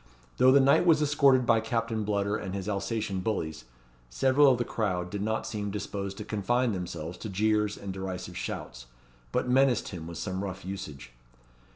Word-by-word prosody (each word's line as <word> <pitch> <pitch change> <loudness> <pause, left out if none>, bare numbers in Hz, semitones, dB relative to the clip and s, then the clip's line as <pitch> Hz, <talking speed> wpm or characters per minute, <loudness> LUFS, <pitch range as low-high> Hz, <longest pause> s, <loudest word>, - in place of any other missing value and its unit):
Though 130 - +6
the 140 - +7
knight 140 +6 +4
was 160 -2 +6
escorted 140 -4 +4
by 115 -1 +4
Captain 115 -1 -1
Bludder 100 0 0
and 100 -2 -4
his 95 0 -4
Alsatian 100 -1 -2
bullies, 80 - -3 0.4
several 135 - +4
of 125 - +2
the 120 - -1
crowd 90 -5 -2
did 100 - -3
not 110 +1 -1
seem 105 -2 -3
disposed 100 -1 -4
to 105 - -6
confine 120 +4 0
themselves 85 -3 -5
to 110 - -6
jeers 105 +1 +1
and 100 -1 -6
derisive 95 -1 -5
shouts, - - -6 0.4
but - - 0
menaced 130 0 +3
him 85 -4 -7
with 85 -1 -7
some 95 +2 -3
rough 95 -1 -6
usage. 75 -10 -7
105 Hz, 180 wpm, -28 LUFS, 95-115 Hz, 0.4 s, the